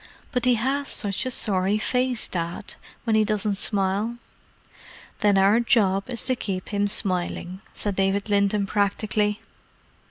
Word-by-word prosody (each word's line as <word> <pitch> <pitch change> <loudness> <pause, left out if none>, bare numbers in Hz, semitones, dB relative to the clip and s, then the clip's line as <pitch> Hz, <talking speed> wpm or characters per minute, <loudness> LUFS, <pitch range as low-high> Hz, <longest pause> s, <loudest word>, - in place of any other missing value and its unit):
"But 250 -1 -1
he 250 -1 +5
has 270 +5 -1
such 205 +3 -1
a - - 0
sorry 200 -4 +1
face, 250 +1 0
Dad, 170 +2 -4 0.3
when 225 -2 +1
he 215 - +4
doesn't 210 -1 0
smile." 205 +3 0 1.0
"Then 205 -2 +3
our 200 +4 +5
job 205 -4 +2
is 240 -3 -2
to 255 - +1
keep 190 -6 -4
him 205 -1 +1
smiling," 185 -2 0
said 205 -2 -3
David 195 +1 +1
Linton 200 0 +2
practically. 210 +1 0
205 Hz, 145 wpm, -24 LUFS, 195-225 Hz, 1.0 s, he